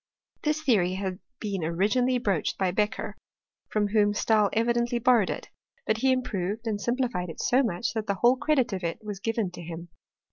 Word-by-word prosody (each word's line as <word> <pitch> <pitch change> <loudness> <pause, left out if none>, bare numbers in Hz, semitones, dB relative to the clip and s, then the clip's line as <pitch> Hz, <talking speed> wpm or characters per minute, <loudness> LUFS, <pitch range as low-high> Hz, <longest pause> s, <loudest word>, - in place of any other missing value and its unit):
This 305 +1 0
theory 190 - +3
liad 190 -1 -3 0.2
been 200 -5 -3
originally 215 +10 +2
broached 200 -9 0
by 190 -2 +1
Beccher, 210 +3 -1 0.6
from 210 -1 +1
whom 205 -1 +3
Stabl 215 -1 +3
evidently 235 +1 +1
borrowed 235 -4 +4
it, - - -5 0.4
but 220 - +1
he 265 +3 +3
improved 225 -4 -2
and 210 -2 -2
sim« 240 +4 0
{dified 235 -9 -1
it 165 - -8
so 255 +2 +3
much 230 -1 -1
that 220 -1 -3
the 200 - +1
whole 240 +6 +4
credit 260 -4 +1
of 190 -1 -4
it 165 -1 -2
was 205 -2 -5
given 225 -3 -1
to 175 - -9
him. 170 +1 -7
215 Hz, 190 wpm, -27 LUFS, 190-240 Hz, 0.6 s, borrowed